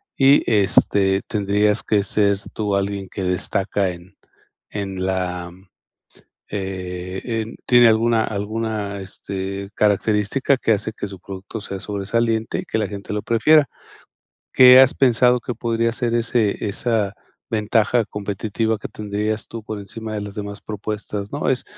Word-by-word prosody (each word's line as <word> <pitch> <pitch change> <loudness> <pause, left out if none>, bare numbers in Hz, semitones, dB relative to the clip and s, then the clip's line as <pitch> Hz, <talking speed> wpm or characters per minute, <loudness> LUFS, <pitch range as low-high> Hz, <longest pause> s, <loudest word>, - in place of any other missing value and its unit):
y 135 +1 +5
este, 95 -1 +3
tendrías 105 +1 +1
que 105 -2 +2
ser 100 0 +2 0.2
tú 105 -2 -1
alguien 100 -1 -2
que 95 - -5
destaca 95 +2 0
en 90 +2 -13 0.5
en 95 -2 -4
la, 90 -2 -2 1.0
eh, 95 -2 -5
en 115 -2 -3
tiene 120 -1 +6
alguna 115 0 +3
alguna, 105 -1 -3
este, 95 +1 -6
característica 105 +6 +2
que 115 - +2
hace 105 +1 -2
que 105 - -4
su 95 -2 -10
producto 95 +4 -8
sea 100 -1 -6
sobresaliente 110 +3 -1
y - - -5
que - - -2
la 105 - 0
gente 100 -1 -7
lo 105 - -2
prefiera. 145 +7 +4 0.9
¿Qué 130 0 +9
has 130 -1 +5
pensado 125 -1 +4
que 120 - -5
podría 115 0 0
ser 120 0 -2
ese 115 -3 0
esa 105 -1 -1 0.4
ventaja 110 +2 +2
competitiva 105 +2 -2
que - - -6
tendrías 105 +1 -3
tú 115 -1 -7
por 110 -1 -5
encima 110 +2 -7
de 105 - -2
las 100 -1 -7
demás 100 0 -6
propuestas, 105 -1 -5
¿no? 145 - -2
¿Es 130 -2 0
105 Hz, 145 wpm, -21 LUFS, 100-115 Hz, 1.0 s, Qué